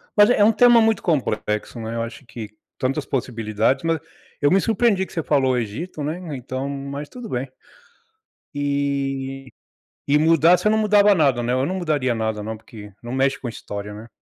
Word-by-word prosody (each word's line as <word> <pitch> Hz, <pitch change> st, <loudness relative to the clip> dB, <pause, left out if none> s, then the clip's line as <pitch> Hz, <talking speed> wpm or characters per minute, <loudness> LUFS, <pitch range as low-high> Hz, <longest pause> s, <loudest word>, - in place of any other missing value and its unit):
mas 205 Hz, 0 st, +6 dB
é 230 Hz, -, +3 dB
um 220 Hz, +2 st, +5 dB
tema 240 Hz, 0 st, +6 dB
muito 220 Hz, -1 st, +2 dB
complexo, 110 Hz, -, -1 dB
né, 110 Hz, +1 st, -5 dB
eu 115 Hz, -, -1 dB
acho 115 Hz, +4 st, -7 dB
que 115 Hz, -2 st, -8 dB, 0.3 s
tantas 135 Hz, +2 st, -1 dB
possibilidades, 115 Hz, 0 st, -1 dB
mas 165 Hz, -1 st, +1 dB, 0.4 s
eu 145 Hz, -, +4 dB
me 190 Hz, -, +4 dB
surpreendi 220 Hz, -3 st, +2 dB
que -, -, -17 dB
você 165 Hz, -, -1 dB
falou 140 Hz, -4 st, +2 dB
o -, -, +1 dB
Egito, 125 Hz, -, -4 dB
né, 150 Hz, +4 st, -2 dB, 0.2 s
então, 130 Hz, +1 st, -5 dB
mas 140 Hz, +1 st, -5 dB
tudo 245 Hz, -2 st, -9 dB
bem. 125 Hz, +1 st, -3 dB, 1.0 s
Eh, 140 Hz, -1 st, -2 dB, 0.6 s
e 145 Hz, +1 st, +4 dB
mudar 165 Hz, +2 st, +5 dB
você 180 Hz, -, +1 dB
não 215 Hz, -, +3 dB
mudava 210 Hz, -1 st, +5 dB
nada 140 Hz, -8 st, +2 dB
né, 120 Hz, +1 st, -1 dB
eu 130 Hz, +1 st, +1 dB
não 185 Hz, +6 st, -2 dB
mudaria 150 Hz, -8 st, 0 dB
nada 110 Hz, -1 st, -2 dB
não, 110 Hz, +2 st, -4 dB
porque 105 Hz, -1 st, -12 dB
não 120 Hz, 0 st, -6 dB
mexe 135 Hz, +1 st, +1 dB
com 125 Hz, -, -4 dB
história, 105 Hz, -2 st, -7 dB
né? 110 Hz, +3 st, -10 dB
135 Hz, 190 wpm, -22 LUFS, 120-165 Hz, 1.0 s, mas